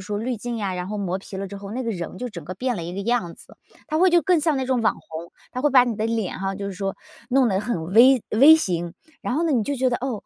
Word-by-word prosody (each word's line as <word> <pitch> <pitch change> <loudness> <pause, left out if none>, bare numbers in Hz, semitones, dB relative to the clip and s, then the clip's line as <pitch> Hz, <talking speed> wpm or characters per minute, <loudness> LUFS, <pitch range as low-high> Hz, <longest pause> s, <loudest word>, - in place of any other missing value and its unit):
说 205 +2 -4
滤 240 +3 -2
镜 240 +2 -5
呀， 200 -4 -2
然 180 0 -4
后 210 0 -4
磨 185 -2 -2
皮 190 0 -9
了 195 +1 -4
之 200 +1 -8
后， 200 0 -9
那 245 +4 -4
个 230 - -1
人 175 -4 -6
就 250 - -4
整 170 -9 -9
个 185 +4 -6
变 250 +5 -2
了 175 - -5
一 170 +1 -6
个 195 - -4
样 200 -6 -1
子， - - -13 0.3
他 310 - -2
会 370 +2 +5
就 345 0 +5
更 340 +1 +2
像 310 -1 +1
那 265 -1 -2
种 255 -2 +1
网 - - +2
红。 160 +1 -9 0.2
它 255 - -3
会 295 +2 +2
把 255 -2 +6
你 240 -2 -2
的 215 +1 -2
脸 225 -5 -2
哈， 195 0 -2
就 200 0 -5
是 200 - -4
说 195 +1 -4 0.3
弄 260 0 +4
得 190 -2 0
很 185 -6 -3
V 250 +4 +7
V 280 +8 +8
型， 175 - -2 0.3
然 250 - -2
后 325 +4 +1
呢， 325 - +1
你 240 -5 +2
就 285 +6 -2
觉 260 0 +2
得， 240 - 0
哦， 250 -5 -4
220 Hz, 330 characters per minute, -23 LUFS, 190-255 Hz, 0.3 s, V